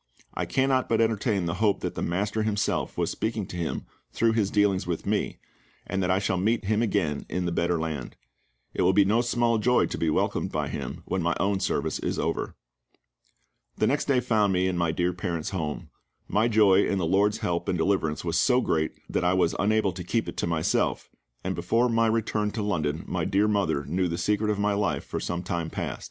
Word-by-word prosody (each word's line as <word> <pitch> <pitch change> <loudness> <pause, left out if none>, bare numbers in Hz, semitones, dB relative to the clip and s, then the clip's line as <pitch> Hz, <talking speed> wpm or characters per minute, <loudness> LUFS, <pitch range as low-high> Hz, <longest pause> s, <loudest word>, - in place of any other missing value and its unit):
I - - -3
cannot 130 -1 +1
but 115 - +2
entertain 110 -4 +1
the 85 - -1
hope 105 -3 +2
that - - -3
the - - -5
MASTER 100 +5 -1
Himself 110 -1 -1
was - - 0
speaking 110 -2 -2
to 90 - -9
him 85 -2 -3 0.3
through 115 +1 +2
His 110 -3 +1
dealings 100 -3 +2
with 85 -2 -3
me, - - -1 0.5
and 95 -1 -2
that 90 - 0
I 95 - +3
shall 95 -1 0
meet 110 +4 +1
him 110 +2 +1
again 95 -10 0
in 90 +1 -2
the 85 - -1
Better 85 0 0
Land. 80 -6 -4 0.6
It - - -1
would 95 - +3
be 100 - +6
no 110 +4 +3
small 120 -1 +1
joy 125 +3 +3
to - - -4
be 80 - +1
welcomed - - 0
by - - -2
him, - - -5
when 95 - -1
my 85 0 +1
own 100 -1 +1
service - - -1
is - - -2
over. - - -2 1.2
The - - +2
next 145 - +1
day 130 -3 +2
found 110 -5 +2
me 90 0 +2
in 95 - -1
my 85 -2 +1
dear 90 +2 0
parents' 85 -3 -3
home. 80 -6 -4 0.4
My 110 +3 +2
joy 105 -4 +5
in 100 - 0
the 90 - 0
LORD's 100 +4 +2
help 85 -1 -2
and 90 - +1
deliverance 80 -3 0
was 85 0 +1
so 125 -1 +4
great 80 -10 0
that - - -1
I 90 +1 +3
was 90 -2 +2
unable 110 0 +2
to 90 +1 -7
keep 110 +6 -1
it - - -5
to - - -1
myself, 80 -2 0 0.3
and - - -1
before 115 +8 +1
my 115 0 +3
return 110 -1 0
to 110 - -2
London 80 -7 -1
my - - -1
dear 100 +2 +2
mother 95 -9 0
knew 90 +4 0
the 85 0 -3
secret 105 +2 0
of 105 - +1
my 100 0 +1
life 100 0 0
for - - -4
some 85 0 -3
time 85 -3 -2
past. - - -4
100 Hz, 220 wpm, -26 LUFS, 85-110 Hz, 1.2 s, be